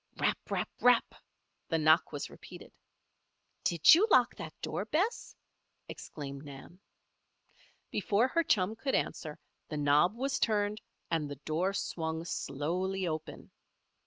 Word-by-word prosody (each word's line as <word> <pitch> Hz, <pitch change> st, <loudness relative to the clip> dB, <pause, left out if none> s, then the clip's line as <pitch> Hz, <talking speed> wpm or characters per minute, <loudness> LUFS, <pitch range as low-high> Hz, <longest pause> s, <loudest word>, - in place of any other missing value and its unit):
Rap! -, -, +1 dB
rap! -, -, -1 dB
rap! 245 Hz, -1 st, +4 dB, 0.6 s
the 165 Hz, -, +1 dB
knock 155 Hz, +2 st, +4 dB
was 145 Hz, -2 st, -5 dB
repeated. -, -, -12 dB, 0.9 s
"Did 170 Hz, -2 st, +6 dB
you 380 Hz, +7 st, +5 dB
lock 250 Hz, -, +5 dB
that 155 Hz, -, -9 dB
door, 195 Hz, -, -2 dB
Bess?" 365 Hz, -, -1 dB, 0.5 s
exclaimed 140 Hz, -2 st, -8 dB
Nan. 145 Hz, +5 st, -11 dB, 1.1 s
Before 210 Hz, +3 st, +2 dB
her 335 Hz, -, +2 dB
chum 205 Hz, -, +1 dB
could 270 Hz, +4 st, -1 dB
answer, 155 Hz, -2 st, -2 dB, 0.3 s
the 150 Hz, -, -4 dB
knob 150 Hz, +7 st, +3 dB
was 270 Hz, +3 st, -1 dB
turned 210 Hz, -1 st, 0 dB, 0.3 s
and 155 Hz, -3 st, 0 dB
the 145 Hz, -, -5 dB
door 175 Hz, +5 st, 0 dB
swung 160 Hz, -3 st, -3 dB
slowly 180 Hz, +6 st, -2 dB
open. 155 Hz, -1 st, -6 dB
175 Hz, 130 wpm, -31 LUFS, 155-220 Hz, 1.1 s, Did